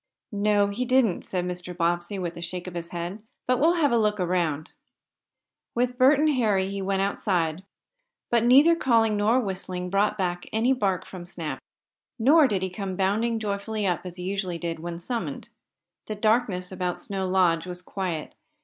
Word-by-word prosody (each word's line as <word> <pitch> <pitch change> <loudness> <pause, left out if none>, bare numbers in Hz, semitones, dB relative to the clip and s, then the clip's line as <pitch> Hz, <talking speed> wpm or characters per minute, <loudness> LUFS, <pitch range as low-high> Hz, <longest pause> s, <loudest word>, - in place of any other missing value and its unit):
"No, 205 -1 +2
he 210 +5 -2
didn't," 250 -6 +2
said 180 -2 -2
Mr. 180 0 -6
Bobbsey, 175 +3 0
with 175 -2 -4
a 170 - -8
shake 180 +1 -5
of 180 - -7
his 170 -1 -5
head. 175 +4 -5 0.2
"But 255 0 +2
we'll 330 +5 +4
have 300 -6 +2
a 235 - +3
look 210 -1 +1
around." 170 -4 -1 1.0
With 245 +1 0
Bert 270 +3 +6
and 305 +2 +3
Harry 205 -7 +1
he 200 0 -4
went 195 0 0
outside. 180 -4 -1 0.7
But 235 -1 +3
neither 280 +8 +6
calling 225 -8 +3
nor 215 +5 +3
whistling 185 -4 -4
brought 205 +1 +1 0.3
any 230 +4 +2
bark 195 -7 0
from 175 -2 -9
Snap. 165 -3 -5 0.6
Nor 285 +6 +6
did 195 -5 -1
he 190 - -1
come 190 0 -4
bounding 210 +5 +1
joyfully 210 0 -2
up, 180 -2 0
as 180 -1 -8
he 180 - -7
usually 190 -2 -2
did 165 -1 -4
when 170 +1 -5
summoned. 230 +7 -4 0.6
The 215 - -3
darkness 210 -4 +1
about 180 -1 -3
Snow 190 -1 -3
Lodge 180 -2 +2
was 180 0 -7
quiet. 180 -6 -4
195 Hz, 175 wpm, -26 LUFS, 180-225 Hz, 1.0 s, Bert